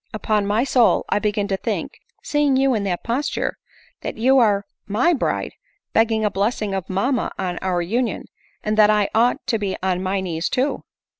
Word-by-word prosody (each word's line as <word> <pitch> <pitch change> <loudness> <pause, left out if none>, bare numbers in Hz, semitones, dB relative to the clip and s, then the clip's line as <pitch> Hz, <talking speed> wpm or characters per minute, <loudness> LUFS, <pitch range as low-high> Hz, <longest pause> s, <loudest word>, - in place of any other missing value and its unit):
Upon 210 -1 0
my 215 +4 +2
soul 250 -4 +3
I - - +2
begin 205 -1 -1
to 195 - 0
think, - - -4 0.2
seeing 295 -2 +2
you 270 0 +3
in 210 -3 -1
that 180 -3 -2
posture, 255 +5 -2 0.4
that - - -5
you 260 +4 +4
are 205 -4 +3 0.2
my 240 +12 +2
bride 280 - -1 0.4
begging 225 -1 +2
a 210 - +1
blessing 205 +1 -1
of 190 -3 -4
mamma 240 +7 0
on 180 -1 -3
our 180 -2 -1
union, 235 +7 -1 0.4
and 215 0 0
that 210 -1 +7
I 210 -1 +3
ought 235 +3 +2
to 225 - 0
be 200 -2 -2
on 185 -1 0
my 190 +1 -1
knees 170 -3 -2
too." 260 +3 0
210 Hz, 190 wpm, -21 LUFS, 195-245 Hz, 0.4 s, that